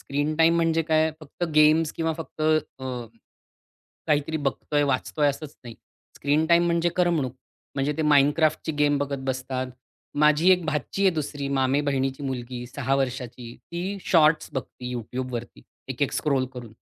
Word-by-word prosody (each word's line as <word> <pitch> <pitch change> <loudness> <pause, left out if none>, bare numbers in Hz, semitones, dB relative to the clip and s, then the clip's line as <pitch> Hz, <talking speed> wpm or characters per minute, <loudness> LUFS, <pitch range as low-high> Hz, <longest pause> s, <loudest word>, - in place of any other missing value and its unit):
Screen 145 +2 -1
time 165 +1 +5
म्हणजे 165 -1 +2
काय 160 0 +2
फक्त 155 +3 -5
गेम्स 155 +1 +5
किंवा 165 -1 -1
फक्त 160 -1 -9 0.4
अ, - - -6 1.2
काहीतरी 150 +1 +1
बघतोय, 145 0 -1
वाचतोय 145 +2 +1
असंच 145 +1 -5
नाही. 120 -1 -8 0.4
स्क्रीन 145 +3 +1
टाईम 170 +1 +5
म्हणजे 170 0 +2
करमणूक 165 -8 +1 0.4
म्हणजे 140 +1 0
ते 160 - 0
माइनक्राफ्टची 150 +2 +3
गेम 145 -1 +3
बघत 140 0 -2
बसतात. 130 0 -2 0.5
माझी 150 +4 +5
एक 180 -2 +4
भाची 155 +5 -2
आहे 195 - +6
दुसरी 145 -2 -3
मामेबहिणीची 135 0 0
मुलगी 125 -2 -4
6 135 +1 -1
वर्षांची, 125 -3 -4
ती 180 +4 -5
शॉर्ट्स 155 -2 +4
बघते 125 -2 -6
YouTubeवरती 120 - -5 0.3
एक, - - -3
एक - - +1
स्क्रॉल 135 -3 +1
करून. 120 -3 -9
145 Hz, 145 wpm, -25 LUFS, 130-160 Hz, 1.2 s, आहे